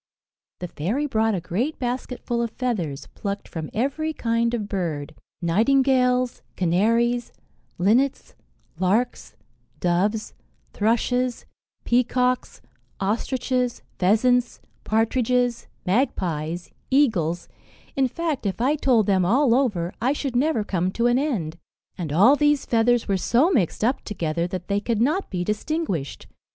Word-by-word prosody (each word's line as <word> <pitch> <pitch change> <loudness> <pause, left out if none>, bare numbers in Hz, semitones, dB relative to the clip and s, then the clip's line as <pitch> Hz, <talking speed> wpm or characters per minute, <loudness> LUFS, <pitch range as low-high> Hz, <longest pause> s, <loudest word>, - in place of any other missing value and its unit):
The 180 - -3
fairy 200 - -2
brought 220 -5 +1
a - - -1
great 220 - -2
basket 250 0 -4
full 235 -1 0
of 235 - -1
feathers, 195 - -3
plucked 200 -1 -4
from 160 -2 -6
every 280 +7 -1
kind 230 -3 0
of 210 -3 -3
bird 160 -7 -3 0.3
nightingales, 250 +6 +2
canaries, 230 +7 +1 0.5
linnets, 235 +9 +1 0.5
larks, 210 +7 0 0.4
doves, 195 +5 0 0.4
thrushes, 240 +3 0 0.4
peacocks, 250 +1 +1 0.4
ostriches, 250 +4 -1 0.2
pheasants, 240 +6 +2 0.2
partridges, 240 +2 +1 0.2
magpies, 175 - -1 0.2
eagles 190 - +2 0.5
in 270 -1 +3
fact, 310 -4 -2
if 195 - -3
I 270 +5 +2
told 250 -7 +3
them 190 -2 +2
all 240 +7 +3
over, 205 -10 +1
I 255 +4 +2
should 275 -3 -3
never 270 -3 +2
come 185 -2 -1
to 235 - 0
an 240 +1 +4
end; 180 - -2 0.4
and 165 -6 -5
all 205 - +6
these 295 -1 +2
feathers 235 0 +2
were 195 -2 +1
so 255 - +3
mixed 210 - +1
up 250 +4 +1
together, 170 -4 -2
that 180 -1 -6
they 200 0 +1
could 225 +1 -1
not 305 - +1
be 180 -2 -2
distinguished. 210 - -3
230 Hz, 130 wpm, -24 LUFS, 185-255 Hz, 0.5 s, all